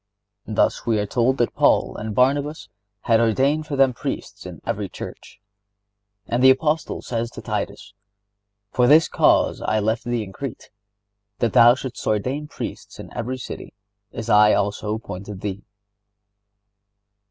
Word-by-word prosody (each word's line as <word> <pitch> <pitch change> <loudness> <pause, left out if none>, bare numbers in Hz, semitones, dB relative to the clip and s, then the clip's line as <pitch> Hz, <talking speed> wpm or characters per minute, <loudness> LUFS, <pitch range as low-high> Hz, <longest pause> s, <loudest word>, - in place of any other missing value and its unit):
Thus 110 - +1
we 115 -2 +2
are 105 - 0
told 125 +4 +1
that 120 - 0
Paul - - +2
and 110 -1 -5
Barnabas 145 +4 +1 0.3
"had 115 -2 +3
ordained 135 +7 +1
for 145 - -3
them 135 -2 +4
priests - - -6
in - - -9
every - - -3
church."(75) - - -10 1.0
And 125 +2 +2
the 130 - +9
Apostle 150 +4 +1
says 115 -1 -3
to - - -10
Titus: 105 - -4 0.8
"For 125 -1 +3
this 155 +4 +6
cause - - +2
I 110 0 0
left 110 +2 -1
thee 120 -2 -1
in 95 -2 -10
Crete,... 135 +2 -7 0.7
that 115 -3 0
thou 120 +1 +7
shouldst 130 -1 -7
ordain 130 +8 -1
Priests - - -7
in - - -10
every 125 +2 -3
city, 125 - -8 0.4
as 115 - -6
I 105 -1 +6
also 105 +1 -1
appointed 100 -2 -8
thee." 100 -1 -4
120 Hz, 150 wpm, -22 LUFS, 105-130 Hz, 1.0 s, the